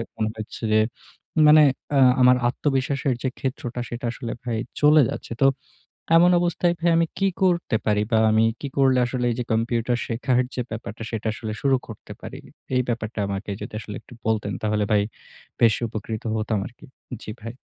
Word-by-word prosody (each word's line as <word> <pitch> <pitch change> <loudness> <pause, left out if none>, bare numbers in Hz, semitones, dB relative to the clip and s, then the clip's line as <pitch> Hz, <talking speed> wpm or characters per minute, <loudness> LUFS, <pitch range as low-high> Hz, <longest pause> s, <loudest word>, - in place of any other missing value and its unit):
মনে 110 -1 -1
হচ্ছে 110 +2 -8
যে 110 - +5 0.7
মানে 155 0 +8 0.3
অ্যা 140 - +3 0.2
আমার 125 0 +6
আত্মবিশ্বাসের 135 0 0
যে 130 - +1
ক্ষেত্রটা 125 -2 -3
সেটা 120 +1 -5
আসলে 120 -1 -6
ভাই 120 -2 -2 0.2
চলে 150 +1 +7
যাচ্ছে। - - -7
তো - - +6 0.7
এমন 175 +2 +6
অবস্থায় 175 0 +1
ভাই 170 +1 +2
আমি 165 - +3
কী 195 - +3
করতে 175 -9 +2
পারি 105 -1 +2
বা 110 - +4
আমি 110 +1 +4 0.2
কি 140 - -3
করলে 135 -2 +4
আসলে 125 0 -2
এই - - -2
যে - - 0
কম্পিউটার 115 +1 0
শেখার 125 +2 +1
যে 125 - -1
ব্যাপারটা 110 0 -6
সেটা 110 -1 -3
আসলে 110 -1 -5
শুরু 135 -1 +3
করতে 110 - -11
পারি? - - -8 0.4
এই 125 - +4
ব্যাপারটা 115 -2 -3
আমাকে 100 +1 -4
যদি - - -7
আসলে 105 -1 -8
একটু - - -16
বলতেন 105 -2 0
তাহলে 105 -1 +1
ভাই 105 -1 +4 0.6
বেশ 115 -2 +5
উপকৃত 110 0 -5
হতাম 110 -1 -1
আরকি। 120 - -12 0.4
জি - - -6
ভাই। 115 +1 -6
120 Hz, 180 wpm, -23 LUFS, 110-135 Hz, 0.7 s, মানে